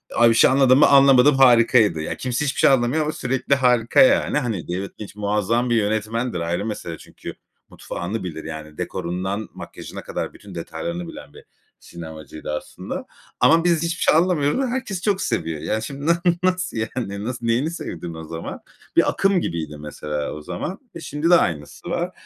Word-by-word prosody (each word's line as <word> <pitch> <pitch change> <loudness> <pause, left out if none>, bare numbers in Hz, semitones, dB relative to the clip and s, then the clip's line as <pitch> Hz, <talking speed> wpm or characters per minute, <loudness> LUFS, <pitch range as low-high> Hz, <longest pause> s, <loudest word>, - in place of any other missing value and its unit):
Abi, 120 0 +6
bir - - +4
şey - - +6
anlamadın 130 -1 +5
mı? - - +7
Anlamadım, 135 0 +6
harikaydı. 115 -8 +5
Ya, 80 - -4
kimse 130 +3 -2
hiçbir 140 - -2
şey - - +6
anlamıyor 135 +3 +2
ama 150 - -1
sürekli 135 +1 0
harika 125 - +3
yani. 265 - +4
Hani, 115 - -3
David 95 +3 -3
Lynch 105 -1 -8
muazzam 105 +4 0
bir 120 - +2
yönetmendir, 110 0 -1
ayrı 85 +4 -2
mesele 85 -7 -5
çünkü. - - -10 0.4
Mutfağını 95 +4 -5
bilir, 80 -3 -6
yani, 80 -1 -8
dekorundan 95 +5 -3
makyajına - - -9
kadar - - -4
bütün 100 -3 -13
detaylarını 170 - -5
bilen - - -11
bir - - -14 0.4
sinemacıydı 80 -3 -9
aslında. 75 - -6 0.3
Ama 165 0 +5
biz 170 -2 +2
hiçbir 170 0 -2
şey - - +4
anlamıyoruz 165 - +2
ama 270 - +1
herkes 240 -7 -3
çok 200 -1 +1
seviyor. 80 -2 -2
Yani, 110 +1 -2
şimdi 140 +5 -6
nasıl, 170 0 +3 0.2
nasıl 185 -5 0
yani? 110 -2 -3
Nasıl, 120 0 -4
neyini 120 +7 +1
sevdin 85 - -6
o 80 0 -8
zaman? 80 +1 -7 0.4
Bir - - +5
akım 195 -2 +2
gibiydi 80 - -4
mesela 75 0 -5
o 75 - -8
zaman. 90 - -5 0.2
E, - - -6
şimdi 150 +1 -2
de 175 - +8
aynısı 75 - -1
var. - - -2
115 Hz, 180 wpm, -22 LUFS, -, 0.4 s, de